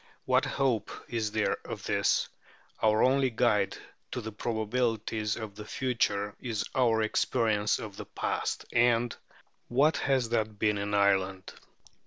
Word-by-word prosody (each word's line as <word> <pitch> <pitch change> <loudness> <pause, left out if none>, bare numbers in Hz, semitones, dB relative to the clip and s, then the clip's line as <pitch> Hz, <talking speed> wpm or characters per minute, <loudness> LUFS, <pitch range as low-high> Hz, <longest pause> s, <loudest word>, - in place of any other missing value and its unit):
What 130 +2 +3
hope 135 -4 0 0.2
is 110 -3 -1
there 110 0 +1
of - - -7
this? - - +1 0.5
Our 110 0 +4
only 130 +1 +3
guide 110 -4 +1 0.3
to - - -3
the 110 0 -6
probabilities 110 -1 -1
of 110 -3 -6
the 105 +1 -8
future 105 -4 -1
is 115 -5 -2
our 115 -4 +3
experience 110 -1 +1
of 105 -3 -8
the - - -6
past - - -2
And 120 0 +3 0.5
what 145 +6 +3
has 130 -4 +1
that 110 -2 -1
been 105 -1 +1
in 105 +1 -1
Ireland? 95 -1 +1
110 Hz, 140 wpm, -29 LUFS, 105-120 Hz, 0.5 s, Our